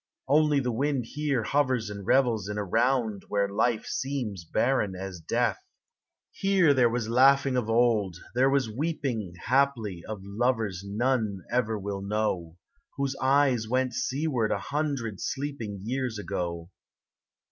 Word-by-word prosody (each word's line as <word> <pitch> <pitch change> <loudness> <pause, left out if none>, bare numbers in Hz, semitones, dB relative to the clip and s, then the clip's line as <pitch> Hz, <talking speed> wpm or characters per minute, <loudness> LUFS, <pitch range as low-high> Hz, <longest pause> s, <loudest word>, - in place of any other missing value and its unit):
Only 150 0 +4
the 125 -2 -1
wind 135 +1 0
here 145 -2 -1
hovers 130 -5 +1
and 100 -2 -8
revels 115 -7 +2
In 105 - -3
a 105 - -1
round 115 0 +1
where 100 -1 +1
life 110 +3 0
seems 125 -10 -3
barren 105 +2 0
as 95 -1 -6
death. 115 +5 0 0.7
Here 190 -6 +3
there 125 -3 +4
was 115 -1 -2
laughing 135 +3 +4
of 120 -3 -1
old, 115 -6 +2 0.2
there 130 +2 +4
was 135 -3 +2
weep 150 +8 -3
in 110 -9 -2
' - - -12
Haply, 120 -10 +1
of 110 -3 -5
lovers 105 -2 -1
none 105 -2 -1
ever 115 -3 +1
will 100 -1 -4
know, 100 -5 -2 0.4
Whose 140 -1 -1
eyes 130 -4 +3
went 130 0 +1
seaward 130 -4 0
a - - +1
hundred 140 -8 -3
sleeping 135 -7 -4
Years 125 0 -2
ago. 85 -4 -4
120 Hz, 145 wpm, -27 LUFS, 105-135 Hz, 0.7 s, Only